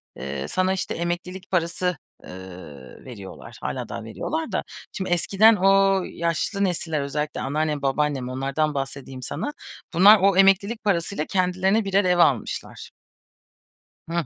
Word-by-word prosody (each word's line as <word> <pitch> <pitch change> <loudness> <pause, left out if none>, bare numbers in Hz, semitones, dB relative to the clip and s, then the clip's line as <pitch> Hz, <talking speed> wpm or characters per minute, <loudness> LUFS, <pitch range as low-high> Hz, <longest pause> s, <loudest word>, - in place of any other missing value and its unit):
eee, 70 +1 -5
sana 185 - +1
işte, 190 - -3
emeklilik 175 +2 -4
parası, 180 -1 0 0.3
eee, - - -12 0.8
veriyorlar, 105 -7 -10
hâlâ - - -4
daha 115 - -6
veriyorlar 310 - -4
da. - - -1 0.3
Şimdi, 190 -3 -4
eskiden 200 +5 +4
o 195 0 +4
yaşlı 170 +5 -2
nesiller, 165 -5 -1
özellikle 150 +2 -3
anneannem, 150 +1 -1
babaannem, 135 -1 0
onlardan 135 +4 -1
bahsedeyim 135 -1 -5
sana, 290 - -4 0.4
bunlar 200 +5 +8
o 195 -1 +4
emeklilik 200 +4 +3
parasıyla 175 -4 0
kendilerine 190 +3 +1
birer 195 +1 +2
ev 180 -1 +3
almışlar. 140 -10 0 1.2
Hıh. 170 -1 -1
175 Hz, 130 wpm, -24 LUFS, 140-195 Hz, 1.2 s, bunlar